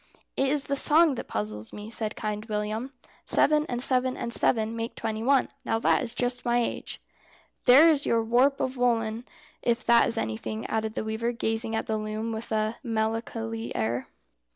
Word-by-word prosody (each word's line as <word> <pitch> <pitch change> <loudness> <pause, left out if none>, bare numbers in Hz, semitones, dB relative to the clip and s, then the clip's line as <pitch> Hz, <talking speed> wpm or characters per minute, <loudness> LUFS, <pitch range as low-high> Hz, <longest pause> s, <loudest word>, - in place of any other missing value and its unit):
"It 270 0 +1
is 290 0 +1
the 280 - -1
song 310 +2 +6
that 255 - -6
puzzles 105 +1 -4
me," 210 +1 -8
said 220 -2 -3
Kind 210 0 -4
William. 215 +3 -3 0.3
"Seven, 300 0 +3
and 245 0 -2
seven, 255 -1 +1
and 235 - -4
seven 225 -2 +1
make 230 +1 -4
twenty 220 -1 -3
one. 270 +2 +3
Now - - 0
that 225 - +2
is 240 -2 -5
just 245 0 -2
my 240 0 +1
age." 240 - -3 0.7
"There 270 +6 +8
is 290 -2 0
your 230 -1 +2
warp 250 +5 +3
of 260 0 -2
woollen, 230 -1 0 0.4
if 235 0 0
that 235 -1 +5
is 230 - -1
anything," 110 - -3
added 220 0 -2
the - - -2
weaver, 220 +2 -2
gazing 225 -1 -1
at - - -2
the 220 - -1
loom 215 +1 -4
with 220 +1 -6
a 215 +1 0
melancholy 225 0 -3
air. 115 +3 -1
225 Hz, 185 wpm, -27 LUFS, 220-245 Hz, 0.7 s, There